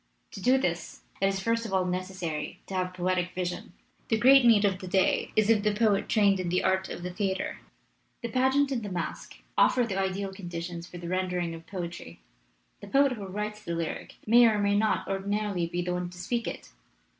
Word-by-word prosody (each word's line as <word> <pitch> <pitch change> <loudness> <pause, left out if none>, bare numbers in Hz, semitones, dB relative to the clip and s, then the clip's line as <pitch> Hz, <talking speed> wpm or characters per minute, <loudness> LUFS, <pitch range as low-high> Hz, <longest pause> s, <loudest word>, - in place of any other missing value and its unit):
To 195 - -8
do 255 +6 +4
this 175 -9 -3 0.2
it 195 - +4
is 195 0 0
first 230 +3 0
of 220 - -6
all 185 -1 +2
necessary 180 -4 -4
to - - -9
have 185 -1 0
the 185 - -16
poetic 180 0 0
vision. 180 -1 -4 0.3
The 225 - +2
great 265 +4 +7
need 225 -4 +6
of 190 -2 +1
the 185 - -7
day 190 0 +2
is 215 +1 +4
of 215 -2 +4
the 210 0 +1
poet 210 -2 +2
trained 200 -3 +4
in 180 -2 -2
the 180 +1 +1
art 190 0 +1
of 175 - -6
the 180 0 -4
theater. 190 -1 -2 0.6
"The 235 - -2
pageant 265 +3 +2
and 250 -3 -1
the 205 - -5
masque 180 - -5 0.2
offer 250 - +4
the 195 -5 -2
ideal 195 0 -2
conditions 175 -2 -6
for 175 - -10
the 175 0 -7
rendering 180 -2 -1
of 165 0 -10
poetry. 175 -3 -7 0.6
The - - -10
poet 275 0 +4
who 210 -6 -5
writes 210 +2 -4
the 170 -5 -4
lyric 165 -1 -4
may 235 +2 +7
or 220 -2 +2
may 200 0 +2
not 215 +1 +1
ordinarily 195 -2 -1
be 175 +1 -2
the 180 0 -2
one 180 0 -3
to 180 - -13
speak 235 +6 -2
it. - - -7
195 Hz, 215 wpm, -28 LUFS, 180-215 Hz, 0.6 s, great